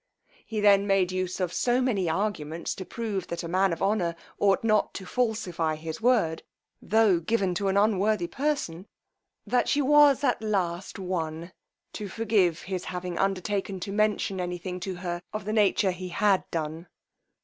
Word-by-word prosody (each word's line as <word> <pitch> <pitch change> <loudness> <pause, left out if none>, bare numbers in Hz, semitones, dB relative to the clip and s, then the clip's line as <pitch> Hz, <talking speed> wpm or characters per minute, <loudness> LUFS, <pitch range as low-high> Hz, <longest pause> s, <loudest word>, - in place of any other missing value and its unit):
He 215 -2 -3
then 200 -1 +5
made 195 -2 +2
use 185 0 -2
of 180 -2 -1
so 245 0 +2
many 210 -9 +1
arguments 165 -3 -2
to 190 - -7
prove, 210 -5 -4
that 170 +1 -4
a - - -4
man 185 +2 +2
of 165 - -3
honour 195 -4 +1 0.2
ought 200 +1 +3
not 215 -2 +2
to 190 - -6
falsify 185 -9 -1
his 160 +2 -7
word, 220 -10 +2 0.4
tho' 215 -5 +3
given 190 +1 0
to 195 +3 -1
an 195 +1 +1
unworthy 205 -2 +2
person, 210 - -2 0.6
that 250 - +1
she 290 - +2
was 290 0 +5
at 250 -5 +1
last 190 -4 -2
won 170 -2 -4 0.4
to 210 - -5
forgive 195 -5 +1
his 185 -1 -4
having 180 -1 -4
undertaken 195 0 -1
to 195 - -4
mention 205 -2 0
any 180 0 -3
thing 180 +1 -6
to 185 +1 -4
her 175 -1 -4
of 215 -2 -4
the 215 - -2
nature 205 -2 +3
he 180 +1 -6
had 200 0 +2
done. 160 +1 -4
195 Hz, 170 wpm, -27 LUFS, 175-215 Hz, 0.6 s, then